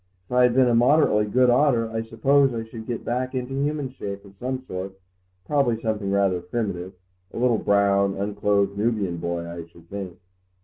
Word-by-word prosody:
If - - -23
I 125 - +4
had 125 -1 +4
been 130 -1 +5
a 120 - +2
moderately 120 -3 +4
good 125 +4 +3
otter 120 -3 +3
I 115 0 -2
suppose 130 +4 +2
I 115 - -3
should 115 0 -10
get 120 -2 -4
back 130 +2 -2
into 130 +1 -3
human 140 0 -2
shape 100 -5 -7
of 100 - -15
some 130 +1 -3
sort; 95 -5 -7 0.5
probably 135 -6 +1
something 110 -3 -2
rather 100 -2 +1
primitive—a 90 -2 -6
little 120 -2 +2
brown, 100 -1 +2
unclothed 100 0 0
Nubian 105 -5 -1
boy, 85 0 -3
I 85 -1 -7
should 85 0 -20
think." 95 -3 -6
110 Hz, 180 wpm, -24 LUFS, 95-125 Hz, 0.5 s, been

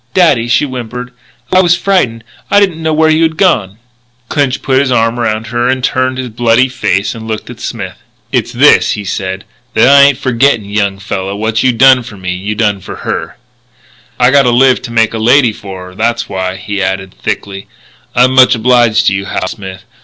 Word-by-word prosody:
"Daddy," 145 -11 +3
she 120 +4 +2
whimpered, 125 -1 -7 0.4
"I 185 - +5
was 175 -1 +3
frightened. 125 -15 0 0.3
I 205 - +4
didn't 185 -5 0
know 160 0 -1
where 155 0 +3
you 155 +1 +2
had 160 -1 0
gone 110 - +1 0.3
" 120 0 -41
Clinch 140 -4 -1
put 130 -1 +2
his 135 -2 0
arm 115 0 +1
around 110 -1 -1
her, 125 +2 0
turned 130 0 -1
his 130 -1 -4
bloody 120 +3 +2
face 100 -5 -1
and 110 -2 -9
looked 110 -1 -5
at - - -12
Smith. - - -6 0.3
"It's - - -1
this," - - +4
he 105 - -5
said, 95 0 -4 0.3
"that - - +4
I 140 +1 +7
ain't 140 -2 +4
forgetting, 130 -4 +1
young 100 -1 -1
fella. 100 -1 -4
What 110 +1 -1
you 130 - +3
done 130 +1 +5
for 110 -3 -11
me 90 -1 -4
you 100 +4 -4
done 105 -3 0
for - - -8
her. - - -4 0.8
"I 125 +1 +4
gotta 140 -3 +4
live 130 +2 +3
to 120 - -7
make 115 -1 +1
a 110 - -3
lady 125 +2 +4
of - - -14
her. 95 -2 -9
That's 115 +4 -1
why," 95 -1 -3
he 100 +1 -5
added 95 0 -3
thickly, 95 -1 -4 0.5
"I'm 125 +1 +4
much 130 -1 +5
obliged 115 -1 +2
to - - +3
you, 100 0 -3
Hal 95 - -3
Smith.... 95 +1 -9
120 Hz, 205 wpm, -12 LUFS, 100-130 Hz, 0.8 s, I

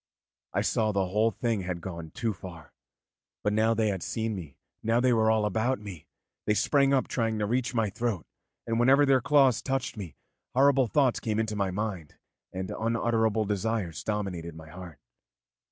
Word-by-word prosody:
I - - 0
saw 110 - +1
that 100 -2 0
the 95 - +2
whole 105 +4 +3
thing 115 -3 -1
had 90 -1 -4
gone 85 -2 -7
too 115 +6 -2
far. 85 -3 -11 0.7
But 105 - +1
now 110 +2 +3
they 110 -1 +2
had 95 -3 -2
seen 110 +4 -2
me, 80 -8 -8 0.2
now 115 +2 +2
they 125 0 +3
were 110 -1 +3
all 110 -1 +3
about 110 +5 0
me, 100 -7 -10 0.4
they 105 - +3
sprang 140 +4 +3
up 135 -2 +2
trying 115 -2 -1
to 105 - 0
reach 120 +3 -1
my 110 -3 +1
throat; 110 -6 -2 0.4
and 115 0 -1
whenever 135 +4 +5
their 135 -2 +4
claws 140 -3 +4
touched 135 -4 -2
me, 90 -8 -7 0.4
horrible 135 -1 +4
thoughts 130 0 +2
came 110 -2 -2
into 110 -1 -1
my 100 -2 0
mind 95 -5 -4 0.4
and 95 0 -4
unutterable 115 -1 +1
desires 105 -4 -2
dominated 95 -6 -3
my 80 -1 -11
heart. 90 -3 -10
110 Hz, 185 wpm, -28 LUFS, 95-120 Hz, 0.7 s, whenever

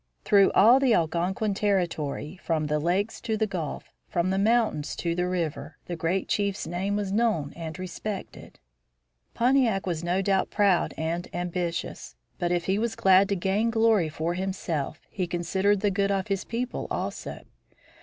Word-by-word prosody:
Through 200 -1 +5
all 235 +6 +7
the 260 -4 +4
Algonquin 175 +5 0
territory, 175 -5 -1
from 160 -2 0
the 150 0 0
Lakes 185 +7 -1
to 220 -2 -1
the 220 - +2
Gulf, 175 -8 -5 0.2
from 175 +2 0
the 190 - +1
mountains 215 -8 +1
to 170 -1 -1
the 180 +1 0
river, 170 -4 -3
the 175 - -4
great 170 +3 -1
chief's 200 -1 -1
name 185 +5 -2
was 205 -2 -2
known 200 -10 +1
and 165 0 -6
respected. 185 +2 -6 0.8
Pontiac 240 -5 +2
was 170 -3 -2
no 180 +3 0
doubt 195 -1 +1
proud 200 -4 +2
and 165 +2 -2
ambitious. 175 -1 -3 0.2
But 175 -2 0
if 175 -1 0
he 195 +2 +1
was 230 0 -1
glad 190 +1 +5
to 200 - +1
gain 195 +5 +1
glory 225 -7 +3
for 160 +2 -2
himself 175 -5 -3
he 185 -3 -3
considered 190 +4 +1
the 205 - +2
good 200 +1 +1
of 195 +1 -1
his 195 -1 -1
people 245 +2 -3
also. - - -4
190 Hz, 165 wpm, -27 LUFS, 170-205 Hz, 0.8 s, all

